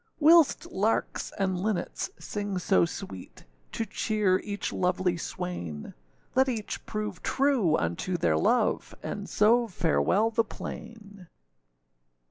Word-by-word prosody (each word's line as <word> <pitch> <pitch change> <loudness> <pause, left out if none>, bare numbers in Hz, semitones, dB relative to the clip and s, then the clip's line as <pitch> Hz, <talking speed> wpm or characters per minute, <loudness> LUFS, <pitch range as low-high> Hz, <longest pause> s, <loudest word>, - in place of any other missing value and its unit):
Whilst 320 0 +6
larks 210 +4 0
and 190 -2 0
linnets 195 -2 -2
sing 205 -2 -4
so 180 0 +3
sweet, 170 - -8 0.3
To 225 - -2
cheer 205 -2 +1
each 205 -1 -4
lovely 180 0 +1
swain; 170 - -5 0.4
Let 265 +1 +4
each 220 -4 -4
prove 210 -4 -4
true 260 - +2
unto 85 - -1
their 80 - +2
love, 80 - +1
And - - -5
so 230 +3 +4
farewell 195 +4 +2
the 230 0 +2
plain. 205 -4 -9
200 Hz, 115 wpm, -28 LUFS, 180-225 Hz, 0.4 s, Whilst